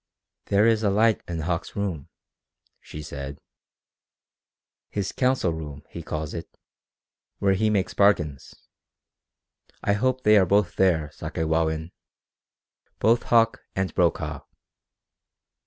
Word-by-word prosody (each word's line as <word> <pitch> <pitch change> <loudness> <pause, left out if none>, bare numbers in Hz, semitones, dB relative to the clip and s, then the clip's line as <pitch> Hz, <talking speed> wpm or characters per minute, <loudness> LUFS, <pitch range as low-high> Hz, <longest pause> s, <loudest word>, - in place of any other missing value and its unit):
"There 100 +2 +4
is 115 -1 +3
a 105 - +2
light 110 +1 +3
in 85 -2 -3
Hauck's 85 +1 -3
room," 95 -9 -3 0.7
she 75 - -9
said. 70 -1 -7 1.5
"His 100 -2 -2
council 125 -9 +1
room, 75 -3 -7
he 85 - -7
calls 80 -2 -4
it 85 - -8 0.8
where 100 -1 +2
he 110 +3 +1
makes 100 -3 0
bargains. 75 -9 +1 1.3
I 100 - +2
hope 130 +4 0
they 105 0 +6
are 95 - +4
both 100 -1 +2
there, 85 -6 +2
Sakewawin 80 +1 -1 1.1
both 115 +2 +3
Hauck 115 -1 +3 0.2
and 95 -1 -1
Brokaw." 85 -2 0
95 Hz, 115 wpm, -25 LUFS, 80-105 Hz, 1.5 s, they